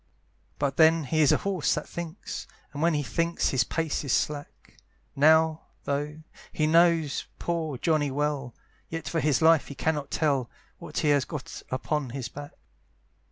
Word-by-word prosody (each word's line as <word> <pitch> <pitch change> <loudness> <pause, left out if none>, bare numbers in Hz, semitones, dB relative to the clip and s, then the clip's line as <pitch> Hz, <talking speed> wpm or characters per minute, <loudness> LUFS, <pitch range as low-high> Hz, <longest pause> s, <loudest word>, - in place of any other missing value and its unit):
But 140 -1 -1
then 160 0 +5
he 155 +3 +1
is 150 - +5
a - - +4
horse 190 -6 +1
that 150 - -4
thinks! 170 -2 -6 0.3
And 145 - -5
when 165 -1 +3
he 145 - 0
thinks 170 +4 0
his 130 -2 +2
pace 160 +4 -2
is 140 - -3
slack; 145 +3 -2 0.4
Now, 160 +2 +4 0.2
though 150 +2 -3 0.3
he 155 - 0
knows 165 -2 +3
poor 160 -5 -2
Johnny 155 0 +1
well, 140 -3 -2 0.3
Yet 165 -1 -5
for 165 - -1
his 150 0 +2
life 160 -2 +5
he 140 - -8
cannot 150 -1 -1
tell 140 -6 0 0.3
What - - -8
he 150 - +2
has 145 -2 +4
got 150 -1 -7
upon 140 +1 -2
his 125 -1 -5
back. 145 0 -9
150 Hz, 165 wpm, -27 LUFS, 140-160 Hz, 0.4 s, then